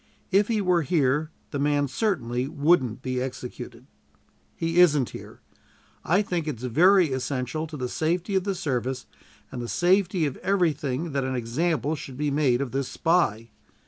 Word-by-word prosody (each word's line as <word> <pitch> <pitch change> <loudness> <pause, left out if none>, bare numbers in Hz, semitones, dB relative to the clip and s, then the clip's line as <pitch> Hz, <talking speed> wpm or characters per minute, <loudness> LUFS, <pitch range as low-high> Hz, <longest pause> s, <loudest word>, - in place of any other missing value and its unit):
If 200 +2 +4
he 220 -3 0
were 180 -3 +2
here, 150 0 +1 0.2
the 145 - -3
man 145 0 +1
certainly 130 - -1
wouldn't 140 -5 +1
be 130 -1 -2
executed. 125 -2 -7 0.7
He 165 +1 0
isn't 150 -8 +4
here. - - -11 0.6
I 180 +6 +2
think 175 -5 -2
it 145 -6 -3
very 165 - +4
essential 130 +3 -3
to 155 -1 -8
the 125 -2 -3
safety 170 - -1
of 190 -1 +2
the 195 0 -2
service 130 -5 -2 0.5
and 125 - -5
the 120 - -4
safety 180 - +2
of 140 -3 -3
everything 160 -5 0
that 140 -1 -1
an 130 0 -2
example 150 +6 -1
should 135 -3 -9
be 150 0 -1
made 140 -3 +2
of 135 -4 -3
this 135 -1 -2
spy. 115 -10 0
145 Hz, 165 wpm, -25 LUFS, 130-175 Hz, 0.7 s, If